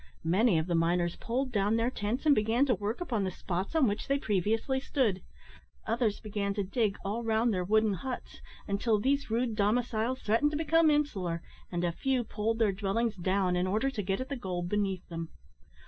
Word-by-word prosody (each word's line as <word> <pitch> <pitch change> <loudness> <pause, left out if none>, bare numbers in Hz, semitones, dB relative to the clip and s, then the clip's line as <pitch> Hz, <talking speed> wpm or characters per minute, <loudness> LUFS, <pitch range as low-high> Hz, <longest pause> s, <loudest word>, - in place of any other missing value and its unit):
Many 190 +3 +3
of 160 - +1
the 175 - -2
miners 170 +1 +1
pulled 255 +3 -2
down 205 0 +2
their 230 +2 +1
tents, 235 +6 -3
and 300 - +7
began 225 +3 +2
to 260 - +2
work 210 - -3
upon 235 - -1
the 190 - 0
spots 185 - -4
on 315 -4 +5
which 205 0 -2
they 275 - +2
previously 220 +4 0
stood. 240 -9 0 0.6
Others 225 -2 0
began 200 -2 -2
to 205 - 0
dig 205 +1 0
all 215 +4 -2
round 225 +1 +2
their 180 -1 0
wooden 215 +2 +3
huts, 250 +7 -6 0.3
until 210 +2 +1
these 275 +4 0
rude 230 0 0
domiciles 230 +3 +1
threatened 230 +8 +3
to 295 - -3
become 325 0 +4
insular, 195 - 0 0.3
and 175 -1 -1
a 175 - +1
few 260 +7 0
pulled 225 0 -2
their 220 -3 +3
dwellings 205 +3 -1
down 185 0 +1
in 180 +1 +1
order 220 +8 +1
to 220 - -3
get 195 0 -1
at 255 - -5
the 280 - -2
gold 180 -7 -3
beneath 195 -2 -1
them. 165 -1 -5
215 Hz, 200 wpm, -30 LUFS, 190-245 Hz, 0.6 s, and